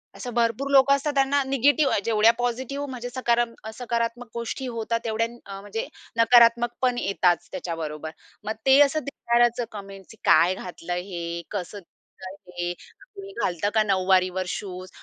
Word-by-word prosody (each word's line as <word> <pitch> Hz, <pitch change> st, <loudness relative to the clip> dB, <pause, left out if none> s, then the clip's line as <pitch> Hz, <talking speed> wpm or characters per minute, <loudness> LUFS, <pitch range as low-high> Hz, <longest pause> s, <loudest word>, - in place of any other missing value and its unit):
असं 245 Hz, -2 st, -7 dB
भरपूर 235 Hz, +4 st, 0 dB
लोकं 275 Hz, 0 st, +6 dB
असतात 290 Hz, +1 st, -2 dB
त्यांना 275 Hz, +1 st, +3 dB
निगेटिव्ह 275 Hz, +2 st, +3 dB
जेवढ्या 225 Hz, 0 st, +5 dB
पॉझिटिव्ह 260 Hz, +4 st, -2 dB
म्हणजे 245 Hz, -1 st, -6 dB
सकारा 240 Hz, -1 st, +1 dB, 0.3 s
सकारात्मक 235 Hz, 0 st, -3 dB
गोष्टी 235 Hz, +3 st, -4 dB
होतात 230 Hz, -1 st, -2 dB
तेवढ्या 225 Hz, 0 st, 0 dB, 0.2 s
अ, 195 Hz, -1 st, -8 dB
म्हणजे 205 Hz, +2 st, -5 dB, 0.3 s
नकारात्मक 235 Hz, 0 st, +6 dB
पण 250 Hz, -1 st, +2 dB
येतातच 185 Hz, -5 st, +1 dB
त्याच्याबरोबर. 160 Hz, -4 st, -5 dB, 0.3 s
मग 215 Hz, +1 st, -2 dB
ते 270 Hz, +1 st, +6 dB
असं 290 Hz, +2 st, +4 dB
दिसणारचं 240 Hz, -3 st, +1 dB
कमेंट्स, 195 Hz, -2 st, -10 dB
की 220 Hz, -, -15 dB
"काय 180 Hz, +2 st, +5 dB
घातलं 180 Hz, -2 st, -8 dB
आहे 175 Hz, -, -2 dB
हे. 170 Hz, -2 st, -5 dB
कसं 200 Hz, 0 st, -5 dB
दिसतं 185 Hz, +1 st, -14 dB
आहे 175 Hz, -2 st, -6 dB
हे. 175 Hz, -, -2 dB, 0.4 s
कोणी 395 Hz, 0 st, -9 dB
घालतं 175 Hz, +3 st, 0 dB
का 220 Hz, -1 st, +4 dB
नऊवारीवर 185 Hz, -2 st, +2 dB
शूज?" 185 Hz, -1 st, -6 dB
230 Hz, 155 wpm, -25 LUFS, 185-245 Hz, 0.4 s, लोकं